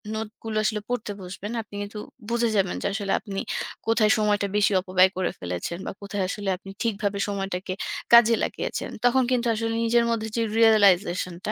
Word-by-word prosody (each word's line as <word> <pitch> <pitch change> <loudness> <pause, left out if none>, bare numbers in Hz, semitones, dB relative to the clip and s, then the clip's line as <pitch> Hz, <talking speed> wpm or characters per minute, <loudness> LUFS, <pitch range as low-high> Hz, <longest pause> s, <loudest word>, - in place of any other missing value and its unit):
নোটগুলো 220 0 -5
আসলে 210 -1 0
পড়তে 245 -4 -2
বসবেন 190 +3 -7
আপনি 205 - -13
কিন্তু 205 +1 -6 0.3
বুঝে 235 0 +1
যাবেন 190 -3 +1
যে - - 0
আসলে 200 -2 -2
আপনি 195 -3 -5 0.5
কোথায় 220 -1 +4
সময়টা 205 -1 +1
বেশি 210 0 +3
অপব্যয় 185 0 +4
করে 185 - 0
ফেলেছেন 90 - -4
বা - - -3
কোথায় 200 -1 -3
আসলে 200 0 -3
আপনি 195 - -13
ঠিকভাবে 205 -3 -1
সময়টাকে 195 -2 -3 0.4
কাজে 235 -1 +8
লাগিয়েছেন? - - -3 0.2
তখন 255 +1 +4
কিন্তু 245 -1 +1
আসলে 225 +1 -2
নিজের 235 +1 +3
মধ্যে 220 -1 -1
যে - - +2 0.2
realization-টা, 195 -4 +3
205 Hz, 165 wpm, -25 LUFS, 195-225 Hz, 0.5 s, কাজে